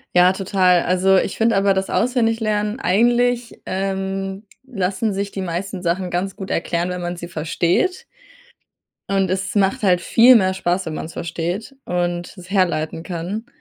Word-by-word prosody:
Ja, 180 +1 +6
total. 185 -2 +2
Also, 190 +1 +3
ich - - -1
finde 225 -1 +2
aber 195 0 +3
das 190 0 -2
Auswendiglernen 225 -2 0
eigentlich, 240 +4 +1
ähm, 195 +1 -3 0.2
lassen 205 -2 -1
sich 200 +1 -2
die 195 - -5
meisten 185 +1 -4
Sachen 180 +2 -1
ganz 185 +2 -2
gut 195 -2 -7
erklären, 170 +1 -1
wenn 180 0 -4
man 175 0 -3
sie 175 0 -7
versteht. 170 - 0 1.1
Und 195 -2 +1
es 195 +3 -2
macht 195 0 +2
halt 180 -3 +3
viel 240 +7 +6
mehr 190 -4 +3
Spaß, 185 0 -1
wenn 160 - -4
man's 160 +1 -6
versteht 175 +9 -4
und 175 +1 -2
es 180 +2 -12
herleiten 165 -5 0
kann. 180 +6 -5
190 Hz, 160 wpm, -20 LUFS, 175-205 Hz, 1.1 s, Ja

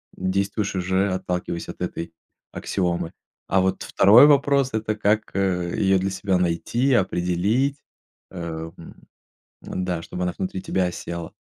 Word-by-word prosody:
действуешь 100 +2 -1
уже, 95 +2 +1
отталкиваясь 90 -2 -3
от - - -9
этой 85 0 -4 0.4
аксиомы. 85 -3 -2 0.4
А 95 - +3
вот 95 0 0
2 105 +8 +7
вопрос- 140 -2 +3
это 110 -1 -1
как, 105 0 0
э, 90 -3 0
её 95 -1 +3
для 95 +1 -1
себя 95 -1 0
найти, 90 +10 0
определить, 100 +7 +1 0.5
э, 95 - -8 0.4
м, 85 - -12 0.7
м-да, 90 -2 -3
чтобы 90 +2 -5
она 90 -1 -1
внутри 95 0 -3
тебя 95 -1 0
осела. 85 -1 -6
95 Hz, 135 wpm, -23 LUFS, 90-105 Hz, 0.7 s, 2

